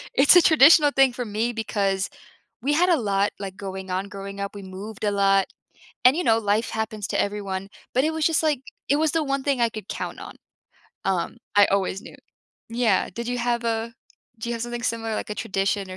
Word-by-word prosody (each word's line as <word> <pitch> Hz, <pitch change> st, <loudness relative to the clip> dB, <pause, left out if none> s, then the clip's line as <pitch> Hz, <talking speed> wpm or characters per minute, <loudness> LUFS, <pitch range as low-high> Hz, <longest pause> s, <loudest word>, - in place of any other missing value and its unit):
It's 280 Hz, +6 st, +6 dB
a -, -, +8 dB
traditional 300 Hz, -1 st, +6 dB
thing 270 Hz, -1 st, +5 dB
for 245 Hz, 0 st, -4 dB
me 220 Hz, +3 st, -1 dB
because 200 Hz, -3 st, -1 dB, 0.5 s
we 280 Hz, +4 st, +1 dB
had 350 Hz, +5 st, +3 dB
a 330 Hz, -6 st, +3 dB
lot, 200 Hz, -2 st, +1 dB
like, 195 Hz, -1 st, -6 dB
going 190 Hz, -1 st, -7 dB
on, 190 Hz, +2 st, -2 dB
growing 195 Hz, 0 st, -8 dB
up, 200 Hz, +1 st, -4 dB
we 200 Hz, -, -8 dB
moved 195 Hz, +3 st, -8 dB
a 205 Hz, -, +2 dB
lot, 195 Hz, -1 st, +3 dB, 0.6 s
and 255 Hz, +3 st, +7 dB
you 360 Hz, -, 0 dB
know 225 Hz, -6 st, +4 dB
life 210 Hz, +1 st, 0 dB
happens 220 Hz, -2 st, -3 dB
to -, -, -1 dB
everyone, 200 Hz, -1 st, -4 dB, 0.2 s
but 260 Hz, +2 st, +2 dB
it 315 Hz, -, +1 dB
was 320 Hz, -1 st, -1 dB
just, 325 Hz, -1 st, +2 dB
like, 300 Hz, -4 st, +1 dB, 0.3 s
it 280 Hz, -, +4 dB
was 315 Hz, 0 st, +1 dB
the 325 Hz, -1 st, 0 dB
one 275 Hz, -1 st, -2 dB
thing 275 Hz, -2 st, 0 dB
I 235 Hz, -, +3 dB
could 215 Hz, -3 st, -8 dB
count -, -, -5 dB
on, -, -, -9 dB, 0.7 s
um, 190 Hz, +4 st, -1 dB, 0.2 s
I 205 Hz, 0 st, +7 dB
always 195 Hz, 0 st, 0 dB
knew, -, -, -12 dB, 0.5 s
yeah. 230 Hz, -5 st, +1 dB
Did 235 Hz, +3 st, -5 dB
you 245 Hz, 0 st, -2 dB
have 235 Hz, 0 st, -1 dB
a 230 Hz, 0 st, -1 dB, 0.5 s
do 230 Hz, -, -5 dB
you 240 Hz, -, -1 dB
have 230 Hz, -, -4 dB
something 240 Hz, 0 st, -5 dB
similar, 225 Hz, -2 st, -2 dB
like, 215 Hz, -, -4 dB
a -, -, -2 dB
tradition 195 Hz, -1 st, -1 dB
or 185 Hz, -, -7 dB
220 Hz, 220 wpm, -24 LUFS, 195-250 Hz, 0.7 s, a